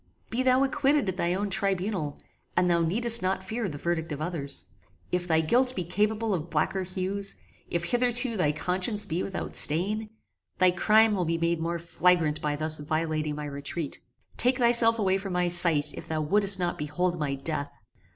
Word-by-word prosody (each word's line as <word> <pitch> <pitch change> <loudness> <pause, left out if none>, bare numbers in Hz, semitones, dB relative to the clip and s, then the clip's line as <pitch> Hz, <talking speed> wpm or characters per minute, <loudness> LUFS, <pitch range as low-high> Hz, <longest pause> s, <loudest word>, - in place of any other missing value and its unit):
Be 240 - 0
thou 260 +1 +3
acquitted 275 -1 +1
at 185 - -4
thy 175 0 0
own 200 +1 -2
tribunal, 190 -6 -1 0.4
and 180 0 +3
thou 170 -1 +2
needest 230 +8 +3
not 190 0 -1
fear 220 +2 -3
the 145 - -6
verdict 165 +1 -2
of 145 - -4
others. 155 -4 -5 0.5
If 180 0 -1
thy 160 -2 +3
guilt 250 +10 +1
be 180 - -2
capable 210 +5 0
of 170 -2 -3
blacker 190 - 0
hues, 190 +2 -3 0.3
if 170 0 -1
hitherto 245 +3 +1
thy 155 -7 +1
conscience 185 +7 -1
be 175 -1 -2
without 195 - -5
stain, 205 +8 +2 0.5
thy 185 -1 +4
crime 215 +4 +4
will 185 -3 0
be 165 +1 0
made 170 0 0
more 170 +1 -2
flagrant 170 -2 +1
by 150 -1 -1
thus 155 +1 -1
violating 155 0 -2
my 150 0 -5
retreat. 145 +2 -5 0.4
Take 250 +2 +2
thyself 235 -2 +4
away 190 -3 +1
from 195 -1 -6
my 180 0 +1
sight 165 -4 +4
if - - -9
thou 160 -1 -2
wouldest 200 +5 +5
not 175 -1 -2
behold 175 +4 -2
my 140 -2 -1
death! 145 +1 -2
180 Hz, 185 wpm, -27 LUFS, 160-210 Hz, 0.5 s, wouldest